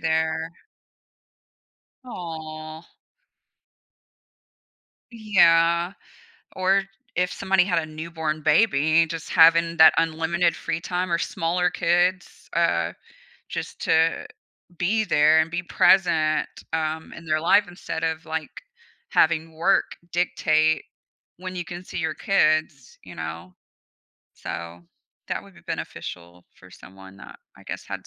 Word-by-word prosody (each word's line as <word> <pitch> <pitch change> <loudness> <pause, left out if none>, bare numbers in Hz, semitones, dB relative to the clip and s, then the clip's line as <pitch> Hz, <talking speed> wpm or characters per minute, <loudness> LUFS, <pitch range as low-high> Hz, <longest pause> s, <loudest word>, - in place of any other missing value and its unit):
there. 160 0 -1 1.5
Aw. 160 -6 -8 2.3
Yeah, 175 -6 +3 0.6
or 190 +1 +2 0.3
if 180 0 0
somebody 190 -2 +2
had 175 -3 +1
a 160 - -4
newborn 155 0 -4
baby, 160 -5 +3
just 165 +1 -7
having 165 +1 +5
that 160 0 +8
unlimited 165 +1 +1
free 165 - -3
time, 180 +1 -3
or 170 - +2
smaller 175 +2 -1
kids, 175 +2 0
uh, 85 - +1 0.6
just - - -6
to 160 +1 +1 0.5
be 210 +6 +1
there 155 -4 +4
and 160 +1 +1
be 175 +1 -3
present, 160 -4 +3 0.3
um, 160 0 -2
in 170 - -11
their 155 -1 +1
life 205 +5 +4
instead 175 -2 -6
of, 160 0 -2
like, 160 -1 -4 0.6
having 160 0 +2
work 175 +5 +1 0.2
dictate 155 -3 +1 0.5
when 185 +1 -7
you 175 -1 -4
can 175 +1 -8
see - - -8
your 160 -2 -1
kids, 155 -6 0
you 90 - -12
know? 80 +3 -7 0.8
So, 85 0 -7 0.5
that - - -3
would - - -17
be - - -17
beneficial 85 0 -7
for 95 -1 -18
someone 95 +1 -14
that - - -13 0.2
I - - -16
guess - - -7
had - - -7
165 Hz, 120 wpm, -24 LUFS, 155-175 Hz, 2.3 s, that